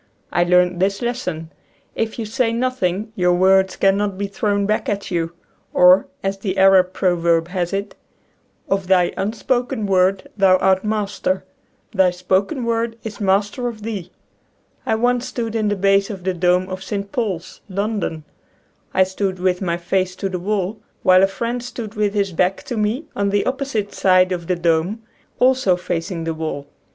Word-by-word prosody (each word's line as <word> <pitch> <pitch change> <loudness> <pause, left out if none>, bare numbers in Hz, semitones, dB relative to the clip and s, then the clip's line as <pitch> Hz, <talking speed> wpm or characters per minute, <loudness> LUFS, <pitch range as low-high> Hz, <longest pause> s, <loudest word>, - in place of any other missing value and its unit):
I 175 - +3
learned 180 0 +3
this 195 +1 +1
lesson: 180 -10 -3 0.4
If 225 -1 -2
you 230 - -3
say 230 +2 0
nothing 225 -4 -1
your 180 -1 +2
words 190 +1 +3
cannot 195 0 +1
bo 200 - -2
thrown 200 0 -1
back 215 +1 0
at 200 -1 -3
you. 170 -1 -1 0.4
Or, 180 +1 +6 0.2
as 195 0 -2
the 195 -1 -3
Arab 190 -1 +5
proverb 170 -3 +1
has 180 -2 -2
it: 200 +1 -3 0.4
" - - -42
Of 195 -1 -1
thy 180 -2 +3
unspoken 235 +3 -1
word 190 0 +2
thou 190 -2 +5
art 190 0 +2
master; 205 -3 -1 0.5
thy 190 -4 +4
spoken 190 - -1
word 230 0 -1
is 220 -1 -7
master 205 +5 +1
of 220 -3 -6
thee." 210 -6 -5 0.8
I - - +2
once 245 +2 +1
stood 235 -3 -4
in 220 -2 0
the 205 - +1
base 195 0 +2
of 195 -4 -7
the 185 0 0
dome 180 +1 +2
of 185 0 -6
St. 200 +1 -4
Paul's, 190 -7 -3
London. 200 -5 -2 0.7
I 190 - +6
stood 190 0 -2
with 180 0 0
my 170 -2 -1
face 185 +1 -1
to 195 - -3
the 185 -1 -3
wall 205 +2 -2 0.2
while 185 -1 +6
a 195 - +5
friend 235 +5 -3
stood 235 -3 -7
with 210 -1 -1
his 200 -2 +1
back 180 +3 0
to 245 - -5
me 220 +8 -1
on 200 0 0
the 200 0 +1
opposite 260 -6 -2
side 185 -1 +4
of 170 -2 -3
the 180 - +1
dome, 170 +6 0 0.4
also 255 -7 +4
facing 175 -1 -3
the 165 0 -2
wall. 155 -3 -4
195 Hz, 175 wpm, -20 LUFS, 180-215 Hz, 0.8 s, Or